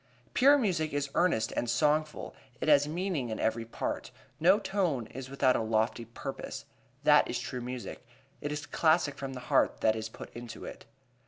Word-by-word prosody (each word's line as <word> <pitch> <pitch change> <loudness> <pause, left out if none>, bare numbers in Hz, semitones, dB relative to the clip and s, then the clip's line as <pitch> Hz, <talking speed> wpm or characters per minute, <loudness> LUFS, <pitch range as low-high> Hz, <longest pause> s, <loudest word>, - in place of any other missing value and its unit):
Pure 280 +3 +6
music 175 - 0
is 145 -1 -1
earnest 115 -12 +2
and 120 - -1
songful. 150 +5 +1 0.3
It - - -3
has 145 -1 +5
meaning 165 -5 -2
in 110 - -4
every 115 +1 0
part. 115 - -4 0.3
No 180 +5 +6
tone 180 - -1
is 130 +3 -8
without 135 -2 +3
a - - +1
lofty 110 +1 0
purpose. 115 - -7 0.4
That - - +5
is - - -1
true 125 - -5
music. 125 0 -6 0.4
It 145 - -3
is 150 0 -4
classic 160 -2 +2
from 135 -1 -5
the 125 - -7
heart 120 - +2
that 110 0 +3
is 110 0 -4
put - - -11
into 120 -1 -8
it. - - -9
140 Hz, 180 wpm, -30 LUFS, 120-155 Hz, 0.4 s, Pure